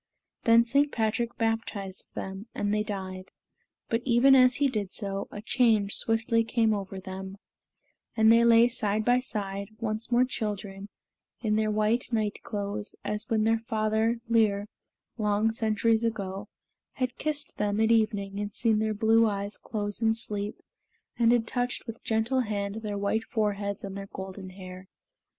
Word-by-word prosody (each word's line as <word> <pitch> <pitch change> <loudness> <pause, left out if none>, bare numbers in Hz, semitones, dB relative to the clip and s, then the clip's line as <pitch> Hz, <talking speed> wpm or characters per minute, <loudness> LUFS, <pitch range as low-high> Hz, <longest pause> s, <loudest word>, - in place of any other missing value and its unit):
Then 230 0 +6
St. 280 +4 +2
Patrick 225 +1 -1
baptized 225 -4 -3
them, 195 +3 -6
and 205 0 0
they 210 - +2
died; 190 -3 -5 0.6
but, 230 +1 0
even 250 +2 +5
as 255 -1 +6
he 285 - +2
did 210 -7 -3
so, 200 -2 -2
a 205 - -8
change 220 -5 +2
swiftly 225 0 +1
came 225 -1 +2
over 195 -1 -4
them; 190 +1 -7 0.8
and 220 0 +6
they 230 +1 +6
lay 235 0 +6
side 215 -3 0
by 245 +1 +4
side, 200 -5 -4
once 220 +1 -2
more 245 +1 +4
children, 205 -4 -4 0.5
in 215 -2 +1
their 215 0 +1
white 215 +4 0
night 215 -2 -1
clothes, 205 0 -4
as 210 +1 -3
when 220 -1 +2
their 225 +1 +2
father 220 0 0
Lir, 215 -3 +2 0.5
long 210 +1 +2
centuries 220 0 +1
ago, 200 -3 -3 0.5
had 255 -1 -3
kissed 295 -1 -3
them 205 0 0
at 220 +1 +3
evening 205 -3 +1
and 205 0 -4
seen 225 -2 +2
their 215 0 0
blue 225 +2 +4
eyes 200 0 -3
close 205 -1 -4
in 225 0 +3
sleep 210 -2 -4 0.6
and 230 -1 +5
had 240 -2 +3
touched 245 +1 -2
with 230 -1 -8
gentle 225 +4 +1
hand 205 -3 -2
their 210 -2 -3
white 200 +3 0
foreheads 205 -3 -2
and 195 -1 -6
their 195 0 -7
golden 190 0 -7
hair. 185 0 -10
215 Hz, 160 wpm, -28 LUFS, 200-230 Hz, 0.8 s, Then